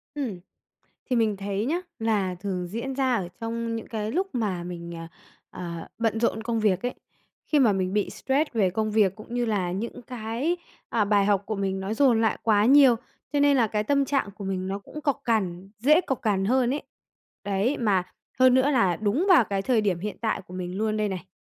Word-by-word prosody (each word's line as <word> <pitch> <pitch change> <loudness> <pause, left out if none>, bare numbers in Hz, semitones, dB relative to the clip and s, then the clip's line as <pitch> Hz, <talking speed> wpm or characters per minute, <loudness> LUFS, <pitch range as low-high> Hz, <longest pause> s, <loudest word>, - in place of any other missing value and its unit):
Ừm. 235 -11 -3 0.7
Thì 250 - +2
mình 220 -3 +2
thấy 200 +2 -2
nhá, 340 +5 0 0.2
là 210 -5 0
thường 180 -1 -4
diễn 235 +7 -4
ra 260 -2 +1
ở 185 -6 -1
trong 230 0 -3
những 225 - -6
cái 215 -1 -3
lúc 375 +4 +1
mà 200 -7 -1
mình, 170 -1 -7
ờ, 165 0 -7 0.4
ờ, 170 -2 -7
bận 225 -1 0
rộn 225 -1 0
công 230 -1 -1
việc 205 -2 +2
ấy, 250 - -3 0.5
khi 300 - +2
mà 235 -6 +5
mình 185 -1 -1
bị 210 -1 0
stress 280 +3 0
về 200 -5 +2
công 215 +3 -1
việc, 210 -3 +3
cũng 220 +3 -10
như 245 0 +1
là 195 -6 0
những 230 +5 -5
cái, 245 +8 -2 0.3
à, 215 -3 +1
bài 200 -1 +3
học 205 -1 +2
của 220 - -2
mình 195 -1 -1
nó 200 +3 -3
dồn 245 -4 +4
lại 220 - +1
quá 210 -2 +3
nhiều, 265 -1 +7 0.4
cho 290 - +2
nên 285 -1 +5
là 235 -3 +4
cái 210 0 -1
tâm 280 +3 +2
trạng 270 -7 0
của 200 0 -9
mình 190 -1 -2
nó 195 - -2
cũng 300 +9 -10
cộc 280 -1 0
cằn, 195 -5 -1
dễ 300 +9 +5
cộc 270 -7 -3
cằn 200 -4 +1
hơn 250 +2 +2
ấy. 295 - -4 0.6
Đấy, 205 +7 0
mà 200 -6 +2 0.4
hơn 255 -1 +6
nữa 260 +3 +4
là 195 - +3
đúng 220 - 0
vào 340 - +7
cái 195 -1 -2
thời 240 -2 +2
điểm 195 -5 0
hiện 210 +1 -4
tại 220 -3 -1
của 180 - -11
mình 180 +1 -4
luôn 215 0 0
đây 210 -1 0
này. 185 -1 -5
215 Hz, 225 wpm, -26 LUFS, 195-245 Hz, 0.7 s, nhiều